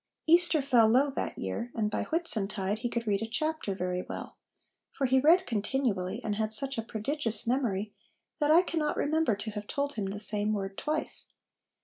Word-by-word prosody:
Easter 335 -2 +5
fell 245 -5 +4
low 265 +5 +3
that - - -4
year, 95 - -4
and 210 -2 -1
by - - -2
Whitsuntide 210 - 0
he 240 +1 -2
could 235 0 -3
read 200 -2 0
a 225 - -3
chapter 310 -5 -2
very 180 -1 -2
well; - - -8 0.6
for 275 - -2
he 260 +1 +3
read 335 +7 +5
continually, 210 -3 -1
and 210 -1 -2
had 220 0 +3
such 270 0 +2
a - - 0
prodigious 225 0 -2
memory, 220 -5 -1 0.5
that 295 -1 +1
I 335 +4 +6
cannot 320 -4 -2
remember 310 -6 +1
to 210 +2 -6
have 210 0 -7
told 285 -1 -2
him 210 -3 -3
the 200 +1 -5
same 210 0 -1
word 195 -1 -4
twice. 305 +6 -1
230 Hz, 190 wpm, -29 LUFS, 205-285 Hz, 0.6 s, I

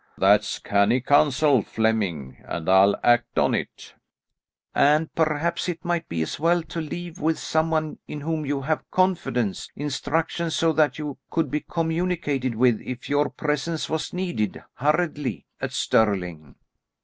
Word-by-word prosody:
"That's 105 +2 +3
canny 100 +5 +2
counsel, 145 0 +4
Flemming, 100 -13 -1
and 80 -2 -5
I'll 95 +2 +6
act 120 0 +3
on - - +3
it." - - -4 0.8
"And 150 +3 +3
perhaps 165 +2 0
it 170 0 -5
might 175 -1 -1
be 80 -1 -1
as 80 - -5
well 170 +2 +2
to 165 +1 -5
leave 175 +2 -6
with 160 +1 +1
some 160 +1 0
one 155 -1 -1
in 150 - -6
whom 160 +1 -2
you 140 -1 -2
have 155 +3 -2
confidence, 135 - 0
instructions 160 +3 -2
so 165 -1 +2
that 155 -1 +2
you 150 -3 -5
could 160 -6 -1
be 150 - 0
communicated 160 -7 -1
with 120 -1 +3
if 125 -1 -7
your 145 +1 +2
presence 150 +2 -2
was 160 -1 -2
needed 175 - -2
hurriedly 150 - 0 0.2
at - - -2
Stirling." 90 -9 0
150 Hz, 150 wpm, -24 LUFS, 115-160 Hz, 0.8 s, I'll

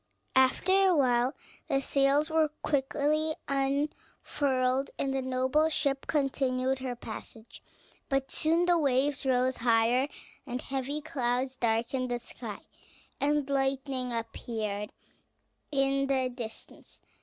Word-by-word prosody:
After 265 +8 +4
a 385 -2 +5
while, 250 -2 +2 0.3
the 275 -4 +2
sails 280 +3 +2
were 315 -1 +3
quickly 300 +2 +1
unfurled, 275 -1 -1
and 270 -1 -1
the 270 - 0
noble 260 +4 +2
ship 280 -3 -1
continued 265 -2 0
her 255 -2 -3
passage; 225 0 -9 0.5
but 270 0 0
soon 330 +3 +2
the 350 -1 +4
waves 275 -1 +1
rose 255 0 +2
higher, 235 +3 +3 0.4
heavy 265 +3 -3
clouds 255 -3 -1
darkened 240 +2 0
the 245 - 0
sky, 240 - -8 0.6
and 290 0 +1
lightning 270 -2 0
appeared 220 -2 -3 0.8
in 275 -1 +1
the 260 -2 +1
distance. 240 -3 -9
270 Hz, 110 wpm, -29 LUFS, 255-285 Hz, 0.8 s, a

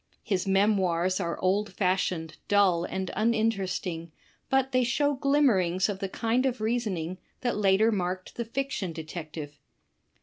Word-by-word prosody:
His 195 -3 -1
memoirs 190 -3 +2
are 170 0 -2
old 200 +3 +1
fashioned, 180 -4 -1
dull 190 -4 +3
and 190 0 -3
uninteresting, 195 -7 0 0.4
but 270 0 +2
they 255 -1 +3
show 285 +5 +1
glimmer 275 -5 +3
ings 180 +3 +1
of 195 -2 -3
the 195 - -3
kind 235 +6 +1
of 255 -2 -2
reasoning 205 -6 -2 0.2
that 245 -1 0
later 205 +2 +4
marked 185 -2 -2
the 235 - -3
Fiction 230 -7 -3
Detective. 155 -2 -7
195 Hz, 140 wpm, -28 LUFS, 180-230 Hz, 0.4 s, later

